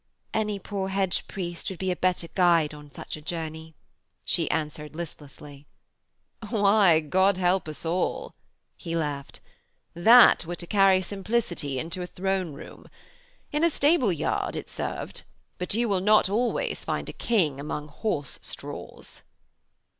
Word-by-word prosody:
'Any 210 -2 0
poor 195 0 -4
hedge 190 -1 -1
priest 175 -3 -5
would 190 - -6
be 190 +1 -1
a - - -1
better 180 -1 0
guide 170 -5 +3
on 150 -1 -12
such - - -7
a 155 - -10
journey,' 160 0 -5 0.5
she - - 0
answered 150 0 -3
listlessly. 145 -3 -9 0.8
'Why, 200 -6 +5
God 190 +5 +2
help 180 -1 +1
us 155 +1 -5
all,' 175 +3 -1 0.4
he 165 -2 -5
laughed, 145 -4 -3 0.5
'that 225 +8 +7
were 175 - -3
to 175 - -7
carry 195 0 +4
simplicity 190 - -2
into 170 +6 -4
a 180 - -4
throne 190 -3 -2
room. 140 - -11 0.6
In 300 +2 0
a 335 - +6
stable 285 - +3
yard 165 - -1
it - - -6
served. - - -4 0.4
But 180 +3 -2
you 235 +1 +1
will 195 -3 +1
not 210 0 +4
always 235 +4 0
find - - -3
a - - -6
king 165 - +1
among 150 +1 -4
horse 145 - -3
straws.' - - -8
180 Hz, 145 wpm, -26 LUFS, 155-200 Hz, 0.8 s, that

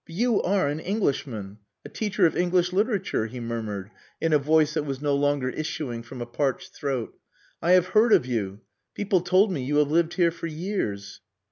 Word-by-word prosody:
"But 165 - -10
you 235 +2 +2
are 190 -5 +1
an 145 +2 -2
Englishman 130 - -2 0.3
a - - -7
teacher 210 -3 0
of 165 - +2
English 180 0 +1
literature," 200 - 0
he 125 +3 -8
murmured, 110 -4 -4 0.3
in 165 -1 +1
a 150 - +5
voice 155 +1 +3
that 155 - 0
was 135 -3 -4
no 145 0 0
longer 140 -2 +1
issuing 140 -5 -4
from 120 +1 -7
a - - -7
parched 135 +3 -2
throat. 135 -5 -3 0.5
"I 175 +3 +4
have 185 0 +4
heard 220 +3 +4
of 130 - +5
you. 105 -5 -3 0.3
People 195 -3 +1
told 185 +3 +3
me 155 -7 -2
you 145 +3 -1
have 150 -1 +3
lived 170 +1 +2
here 175 -2 +3
for 170 0 -6
years." 155 - -4
150 Hz, 200 wpm, -25 LUFS, 125-180 Hz, 0.5 s, a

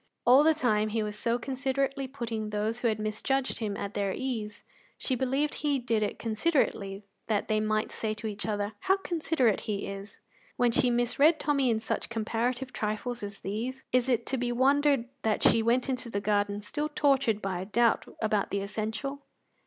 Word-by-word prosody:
All 255 +4 +7
the 320 0 +5
time 215 -6 +2
he 220 0 0
was 210 0 -4
so 230 +2 0
considerately 270 +2 -1
putting 230 -5 -4
those 215 +3 -1
who 245 - +1
had 220 -2 +1
misjudged 215 +5 -1
him 210 -3 -2
at 200 0 -4
their 200 -1 0
ease 220 -6 -4 0.3
she 265 - -1
believed 265 +4 0
he 290 -2 0
did 235 -4 0
it 210 - -1
considerately 215 -5 0 0.2
that 210 -2 0
they 215 0 +2
might 215 0 0
say 215 -1 -2
to 220 - -7
each 210 -1 -3
other, 205 0 -1
"How 385 +1 +2
considerate 320 - +1
he 200 -2 -1
is!" 195 +1 -8 0.4
When 245 -1 +3
she 250 +1 +3
misread 245 +7 +3
Tommy 280 -4 +2
in 225 -2 +2
such 225 - -2
comparative 235 +3 -2
trifles 220 +3 -2
as 200 -1 -6
these, 245 +6 -4
is 255 0 +2
it 245 -3 +1
to 265 - -1
be 240 0 -1
wondered 275 0 +3
that 220 -1 0
she 230 - +5
went 240 +4 +2
into 255 -2 -2
the 200 - -1
garden 205 0 0
still 295 +8 -3
tortured 275 -7 +2
by 190 -3 -3
a - - -5
doubt 230 +3 +2 0.2
about 210 -2 +1
the 200 - -1
essential? 220 +7 -4
230 Hz, 190 wpm, -29 LUFS, 215-265 Hz, 0.4 s, All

